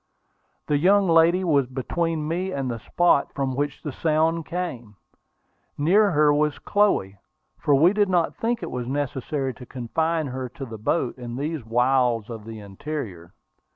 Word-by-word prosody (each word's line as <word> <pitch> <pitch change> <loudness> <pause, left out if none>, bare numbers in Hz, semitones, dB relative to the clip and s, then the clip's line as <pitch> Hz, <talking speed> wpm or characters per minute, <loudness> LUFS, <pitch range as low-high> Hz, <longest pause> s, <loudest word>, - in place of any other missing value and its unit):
The 145 -1 +1
young 195 +4 +4
lady 170 +2 +4
was 145 -7 +2
between 155 +5 -2
me 180 +4 -2
and 135 -6 -2
the 115 - -5
spot 175 +4 +2
from 135 -2 -1
which 145 0 -3
the 150 - -4
sound 160 +2 0
came. 130 - -5 0.8
Near 195 +8 +4
her 150 -3 +4
was 150 0 +1
Chloe, 195 - +1 0.4
for 145 -2 +3
we 165 +7 +5
did 205 -2 +2
not 175 -3 +1
think 235 +1 -2
it - - -5
was 125 -1 -4
necessary 135 0 -2
to 125 +2 -12
confine 160 +6 -1
her 130 -1 -5
to 135 +3 -8
the 115 -3 -9
boats 125 +3 -1
in 120 -1 -6
these 150 +1 -3
wilds 120 -1 +1
of 110 -2 -8
the 110 -1 -8
interior. 100 - -7
145 Hz, 165 wpm, -24 LUFS, 125-165 Hz, 0.8 s, we